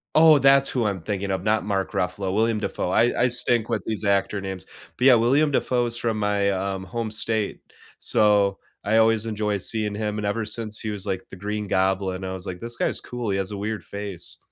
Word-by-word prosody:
Oh, 155 Hz, -2 st, +7 dB
that's 135 Hz, +1 st, +5 dB
who 120 Hz, -4 st, -1 dB
I'm 100 Hz, -4 st, -2 dB
thinking 100 Hz, +2 st, -3 dB
of, 95 Hz, -, -2 dB
not 110 Hz, 0 st, +1 dB
Mark 95 Hz, -2 st, -2 dB
Ruffalo, 95 Hz, +1 st, -2 dB
William 110 Hz, 0 st, +1 dB
Dafoe. 90 Hz, -, -3 dB
I 120 Hz, +5 st, +2 dB
I -, -, +5 dB
stink 120 Hz, -1 st, +1 dB
with 110 Hz, -5 st, -1 dB
these 110 Hz, -1 st, -2 dB
actor 100 Hz, 0 st, +1 dB
names, 95 Hz, -3 st, -6 dB, 0.3 s
but, 125 Hz, -, 0 dB
yeah, 125 Hz, -, +8 dB
William 140 Hz, +6 st, +3 dB
Dafoe 125 Hz, -2 st, +1 dB
is 120 Hz, 0 st, -2 dB
from 115 Hz, -2 st, -2 dB
my, 100 Hz, -1 st, +1 dB
um, 95 Hz, 0 st, -3 dB
home 115 Hz, +4 st, -4 dB
state. 110 Hz, -1 st, -1 dB, 0.4 s
So, 100 Hz, -2 st, +3 dB, 0.3 s
I 110 Hz, +2 st, +2 dB
always 115 Hz, 0 st, +3 dB
enjoy 105 Hz, -1 st, -1 dB
seeing 105 Hz, +1 st, +1 dB
him 105 Hz, 0 st, -3 dB
and 105 Hz, -, -3 dB
ever 110 Hz, +2 st, -1 dB
since 110 Hz, 0 st, -1 dB
he 110 Hz, -, -4 dB
was 105 Hz, -1 st, -3 dB
like 95 Hz, -2 st, -4 dB
the -, -, -10 dB
Green 105 Hz, +2 st, -4 dB
Goblin, 95 Hz, 0 st, 0 dB
I 95 Hz, 0 st, -4 dB
was 95 Hz, -1 st, -5 dB
like, 90 Hz, -1 st, -5 dB
"This 120 Hz, 0 st, -5 dB
guy -, -, +1 dB
is -, -, 0 dB
cool. 120 Hz, -3 st, -5 dB
He 95 Hz, -, 0 dB
has 95 Hz, +1 st, -2 dB
a 100 Hz, -, -5 dB
weird 105 Hz, +1 st, -4 dB
face." 100 Hz, -3 st, -5 dB
105 Hz, 225 wpm, -24 LUFS, 95-115 Hz, 0.4 s, yeah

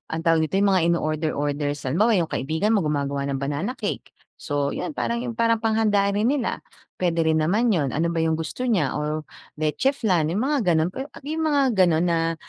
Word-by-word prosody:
anong 165 Hz, -, -4 dB
tawag 165 Hz, -1 st, +3 dB
dito, -, -, -4 dB
yung 200 Hz, 0 st, +3 dB
mga 185 Hz, -2 st, +3 dB
ino-order-order 150 Hz, -2 st, -1 dB
san 135 Hz, -3 st, -5 dB
halimbawa 215 Hz, -, +3 dB
yung 170 Hz, -4 st, 0 dB
kaibigan 160 Hz, +10 st, -1 dB
mo 220 Hz, -, +3 dB
gumagawa 140 Hz, -3 st, -1 dB
ng 140 Hz, -, -2 dB
banana 145 Hz, -, -3 dB
cake. -, -, -5 dB, 0.2 s
So, 145 Hz, -1 st, -2 dB
'yon -, -, -3 dB
parang 235 Hz, +1 st, -2 dB
yun 245 Hz, -, -3 dB
parang 230 Hz, -1 st, +2 dB
panghanda 215 Hz, -3 st, +2 dB
rin 210 Hz, +3 st, +1 dB
nila, 270 Hz, -2 st, 0 dB, 0.4 s
puwede 170 Hz, -2 st, +1 dB
rin 160 Hz, 0 st, +2 dB
naman 210 Hz, +10 st, +2 dB
'yon. 145 Hz, -9 st, 0 dB
Ano 170 Hz, +2 st, 0 dB
ba 165 Hz, -, -1 dB
yung 160 Hz, 0 st, +1 dB
gusto 165 Hz, +11 st, -4 dB
niya 180 Hz, -, +1 dB
or 150 Hz, +1 st, -2 dB, 0.3 s
leche 155 Hz, -, 0 dB
flan, 185 Hz, -, +1 dB
yung 190 Hz, +8 st, -1 dB
mga 265 Hz, -10 st, +1 dB
gano'n. 160 Hz, +1 st, +2 dB
We 255 Hz, -, -8 dB
a -, -, -14 dB
yung 315 Hz, +2 st, -3 dB
mga 290 Hz, -2 st, +3 dB
ganon 175 Hz, -6 st, +3 dB
na, 165 Hz, 0 st, 0 dB
170 Hz, 210 wpm, -23 LUFS, 155-220 Hz, 0.4 s, tawag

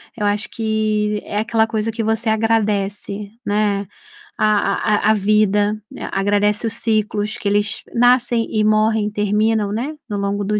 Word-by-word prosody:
eu 210 Hz, -, -2 dB
acho 205 Hz, 0 st, 0 dB
que, 215 Hz, -1 st, -1 dB
é 205 Hz, -, -3 dB
aquela 225 Hz, 0 st, +1 dB
coisa 225 Hz, 0 st, -2 dB
que 225 Hz, 0 st, -3 dB
você 225 Hz, +1 st, 0 dB
agradece, 210 Hz, -2 st, -1 dB
né, 205 Hz, -1 st, 0 dB, 0.5 s
a -, -, +3 dB, 0.3 s
a 210 Hz, -, +1 dB
a -, -, +7 dB
a -, -, +5 dB
vida, 210 Hz, 0 st, +2 dB, 0.4 s
agradece 205 Hz, +3 st, +1 dB
os 220 Hz, -, -2 dB
ciclos 215 Hz, -2 st, -1 dB
que -, -, -4 dB
eles 205 Hz, +1 st, 0 dB
nascem 245 Hz, -1 st, +3 dB
e 215 Hz, -1 st, +1 dB
morrem 215 Hz, 0 st, +2 dB
e -, -, -4 dB
terminam, 210 Hz, 0 st, +1 dB
né, 255 Hz, +9 st, -3 dB
no 205 Hz, -, -2 dB
longo 200 Hz, +1 st, -1 dB
do 210 Hz, +1 st, 0 dB
210 Hz, 165 wpm, -19 LUFS, 205-220 Hz, 0.5 s, a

